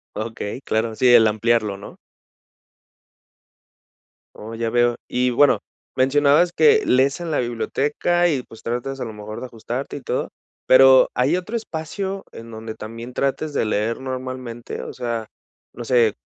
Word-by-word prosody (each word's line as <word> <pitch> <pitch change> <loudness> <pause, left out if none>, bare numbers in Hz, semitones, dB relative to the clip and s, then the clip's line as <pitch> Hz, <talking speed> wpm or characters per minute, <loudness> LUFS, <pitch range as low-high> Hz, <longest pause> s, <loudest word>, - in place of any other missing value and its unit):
Okey, 110 +2 -5
claro, 110 -1 -1
sí, 130 - +2
el 115 -2 +7
ampliarlo, 110 -1 +1
¿no? 100 +1 -11 2.4
Oh, 110 +2 -8
ya 115 0 -2
veo. 120 0 +3
Y 125 0 +1
bueno, 135 +3 +4 0.4
mencionabas 145 +6 +3
que 440 -1 +5
lees 135 +3 +3
en 170 - -4
la 155 - 0
biblioteca 140 +9 0
y 140 -5 0
pues 115 -2 -16
tratas 125 +3 -3
a - - -3
lo 110 - -7
mejor 105 0 -8
de - - -6
ajustarte 120 +4 -5
y - - -9
todo - - -2 0.4
pero, 130 0 +7
¿hay 135 +7 +2
otro 185 +6 -4
espacio 195 0 -5
en 115 0 -11
donde 110 0 -7
también 115 +3 -9
trates 140 +3 -1
de 125 - 0
leer 110 +3 -1
normalmente? 130 -2 -6
O - - -7
sea, 115 -3 -4 0.5
no 120 - -7
sé 115 -3 +3
125 Hz, 155 wpm, -21 LUFS, 115-140 Hz, 2.4 s, el